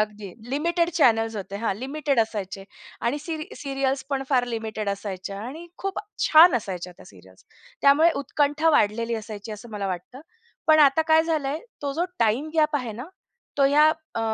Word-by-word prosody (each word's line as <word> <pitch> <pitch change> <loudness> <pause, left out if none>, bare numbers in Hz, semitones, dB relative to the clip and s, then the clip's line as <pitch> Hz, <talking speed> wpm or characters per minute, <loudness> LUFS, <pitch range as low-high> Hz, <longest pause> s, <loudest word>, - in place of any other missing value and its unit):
अगदी 210 -1 -3 0.2
limited 335 +4 0
channels 225 -8 +2
होते 200 0 -6
हां, 215 -1 -1
लिमिटेड 275 +2 -2
असायचे 200 -3 -3 0.4
आणि 275 +5 0
सीरि 310 0 -5
सीरियल्स 270 -1 -2
पण 270 -1 -1
फार 255 -3 +3
लिमिटेड 220 -3 -4
असायच्या 200 0 -5
आणि 300 +9 -8
खूप 390 -1 -3 0.3
छान 315 -2 +8
असायच्या 185 -5 -5
त्या - - -16
सीरियल्स. 95 -1 -18 0.4
त्यामुळे 295 +4 +6
उत्कंठा 295 +3 +1
वाढलेली 230 -2 +1
असायची 215 -1 -7
असं 215 +3 -10
मला 200 -1 -3
वाटतं. 185 +8 -6 0.5
पण 315 0 +6
आता 285 +2 +5
काय 320 0 +6
झालंय, 305 -3 -1 0.2
तो 280 - -2
जो 335 +5 0
टाईमगॅप 300 +7 +1
आहे 245 -5 -4
ना. 245 +9 -8 0.5
तो 275 - +5
ह्या 290 +2 +5
अ, 315 -6 -4
260 Hz, 165 wpm, -24 LUFS, 215-305 Hz, 0.5 s, छान